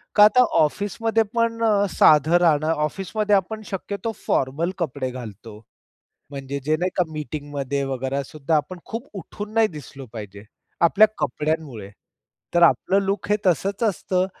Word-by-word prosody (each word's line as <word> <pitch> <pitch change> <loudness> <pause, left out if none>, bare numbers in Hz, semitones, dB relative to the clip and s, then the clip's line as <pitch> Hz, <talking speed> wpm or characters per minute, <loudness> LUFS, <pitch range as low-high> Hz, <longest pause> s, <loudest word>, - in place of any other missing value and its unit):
का 210 - +8
आता 250 +4 +6 0.2
ऑफिसमध्ये 210 +8 +1
पण 230 0 0 0.3
साधं 155 +2 +5
राहणं, 155 -2 +3
ऑफिसमध्ये 195 +7 0
आपण 215 +3 -1
शक्यतो 200 +3 -4
फॉर्मल 145 +7 0
कपडे 135 -5 -2
घालतो. 110 -3 -9 0.7
म्हणजे 140 0 -5
जे 155 +2 +2
नाही 180 +3 -1
का, 180 - +4
मीटिंगमध्ये 145 -1 -4
वगैरे 135 +1 -2
सुद्धा, 155 +2 -1
आपण 175 +4 -3
खूप 230 +4 -6
उठून 205 +4 -8
नाही 225 -1 +4
दिसलो 140 -3 -10
पाहिजे, 105 -2 -9 0.4
आपल्या 195 +6 +6
कपड्यांमुळे. 145 -8 -3 0.6
तर 175 - +4
आपलं 190 +3 +4
लूक 200 +1 -2
हे 210 - +4
तसंच 190 - +1
असतं, 185 -2 0
160 Hz, 135 wpm, -23 LUFS, 140-200 Hz, 0.7 s, का